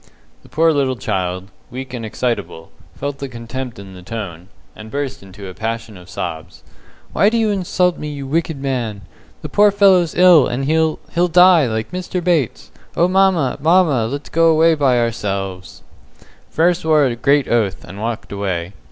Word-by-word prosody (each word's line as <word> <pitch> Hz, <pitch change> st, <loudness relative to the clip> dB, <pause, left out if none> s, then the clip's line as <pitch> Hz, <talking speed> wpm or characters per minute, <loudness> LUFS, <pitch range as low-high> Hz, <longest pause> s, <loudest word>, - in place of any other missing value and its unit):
The -, -, -19 dB
poor 160 Hz, +1 st, +2 dB
little 135 Hz, -3 st, 0 dB
child, 95 Hz, -3 st, -3 dB, 0.2 s
weak 130 Hz, +1 st, -8 dB
and 120 Hz, -2 st, -5 dB
excitable, 110 Hz, -7 st, -4 dB, 0.2 s
felt 140 Hz, -1 st, -5 dB
the 140 Hz, -, -5 dB
contempt 125 Hz, +1 st, -7 dB
in 100 Hz, -1 st, -11 dB
the 90 Hz, -, -11 dB
tone, 90 Hz, -4 st, -7 dB, 0.3 s
and 110 Hz, 0 st, -11 dB
burst 135 Hz, 0 st, -4 dB
into 100 Hz, +1 st, -11 dB
a 95 Hz, -, -8 dB
passion 115 Hz, +2 st, -5 dB
of 90 Hz, 0 st, -14 dB
sobs. 80 Hz, -10 st, -6 dB, 0.5 s
"Why 200 Hz, -, +4 dB
do 230 Hz, -, -1 dB
you 220 Hz, -2 st, +1 dB
insult 180 Hz, -2 st, 0 dB
me, 150 Hz, -, -5 dB
you 145 Hz, -2 st, -6 dB
wicked 160 Hz, +1 st, -2 dB
man? 120 Hz, -7 st, -3 dB, 0.4 s
The -, -, -5 dB
poor 210 Hz, 0 st, +5 dB
fellow's 195 Hz, -4 st, +3 dB
ill, 175 Hz, -5 st, +6 dB
and 130 Hz, +3 st, -3 dB
he'll 160 Hz, +1 st, +1 dB, 0.2 s
he'll 175 Hz, +2 st, +2 dB
die, 180 Hz, -3 st, +5 dB
like 110 Hz, +3 st, -3 dB
Mr. 180 Hz, 0 st, -4 dB
Bates. 165 Hz, -9 st, -1 dB, 0.3 s
Oh, 170 Hz, -, +4 dB
mamma, 185 Hz, -8 st, +2 dB
mamma, 155 Hz, -8 st, +3 dB
Let's 140 Hz, +4 st, -6 dB
go 165 Hz, 0 st, +3 dB
away 160 Hz, +1 st, +4 dB
by 140 Hz, -5 st, +2 dB
ourselves." 100 Hz, -5 st, -3 dB, 0.7 s
Frere 170 Hz, +3 st, +3 dB
swore 160 Hz, -4 st, +2 dB
a 125 Hz, -3 st, -1 dB
great 140 Hz, +3 st, +2 dB
oath, 110 Hz, -5 st, 0 dB
and 100 Hz, +4 st, -10 dB
walked 115 Hz, 0 st, -4 dB
away. 95 Hz, -3 st, -3 dB
130 Hz, 175 wpm, -18 LUFS, 110-165 Hz, 0.7 s, ill